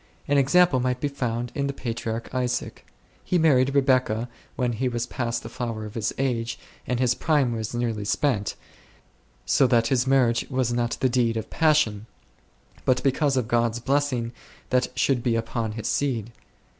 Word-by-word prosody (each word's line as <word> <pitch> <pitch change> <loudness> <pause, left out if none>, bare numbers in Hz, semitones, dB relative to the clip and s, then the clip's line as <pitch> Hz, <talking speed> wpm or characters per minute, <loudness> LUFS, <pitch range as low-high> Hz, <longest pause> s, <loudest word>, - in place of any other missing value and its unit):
An 145 0 +3
example 150 +1 +4
might 125 0 0
be 145 - 0
found 120 -4 -3
in 140 -1 -1
the 140 - -2
patriarch 115 -2 -4
Isaac. 125 -1 -2 0.4
He 180 - +1
married 140 -4 +3
Rebecca 130 -4 +2 0.3
when 125 -1 0
he 125 +3 -1
was 120 -1 -2
past 120 -1 -3
the - - -6
flower 115 -3 -4
of 105 - -8
his 115 -1 -1
age 120 -3 -1 0.3
and 125 -1 -1
his 125 -1 +3
prime 145 -3 +1
was 110 0 -4
well 120 - -1
nigh 115 -3 -2
spent, 105 0 0 0.9
so 135 - +4
that 115 -2 +3
his 130 -1 +1
marriage 125 -4 +3
was 130 -3 0
not 120 -1 -1
the 130 - +4
deed 120 -2 +1
of 110 - -5
passion, 150 -10 +2 0.8
but 130 -1 +2
because 140 0 +2
of 125 -4 0
God's 115 0 +1
blessing 130 -2 0 0.4
that 125 0 +3
should 130 -3 +2
be 115 -1 +1
upon 115 -1 -2
his 110 0 -4
seed. 120 -6 -1
125 Hz, 175 wpm, -25 LUFS, 115-135 Hz, 0.9 s, example